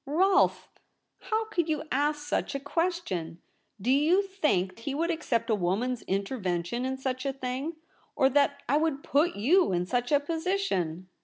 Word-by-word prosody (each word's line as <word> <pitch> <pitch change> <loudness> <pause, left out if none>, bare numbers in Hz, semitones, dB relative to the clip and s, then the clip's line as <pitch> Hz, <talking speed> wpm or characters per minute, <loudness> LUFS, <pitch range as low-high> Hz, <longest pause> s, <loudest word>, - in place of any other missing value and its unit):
' - - -54
Rolfe! 380 +6 +3 0.5
How 445 +1 -1
could 345 -7 -1
you 305 -2 0
ask 295 +2 0
such 290 - -1
a - - -1
ques 340 +5 -1
tion? 165 -2 -4 0.4
Do 230 +6 0
you 315 +8 +4
think 300 - 0
he 270 +4 -4
would 335 +3 0
accept 240 -8 -1
a - - +4
woman's 215 +6 0
intervention 195 +1 -2
in 265 0 -2
such 255 -1 -3
a 275 - 0
thing? 270 +4 -4 0.4
or 265 - +4
that 280 +1 +2
I 285 - +3
would 305 -3 0
put 310 +5 +2
you 305 - +3
in 175 0 0
such 245 +6 -1
a 290 - +5
position 290 - -2
275 Hz, 175 wpm, -28 LUFS, 230-325 Hz, 0.5 s, a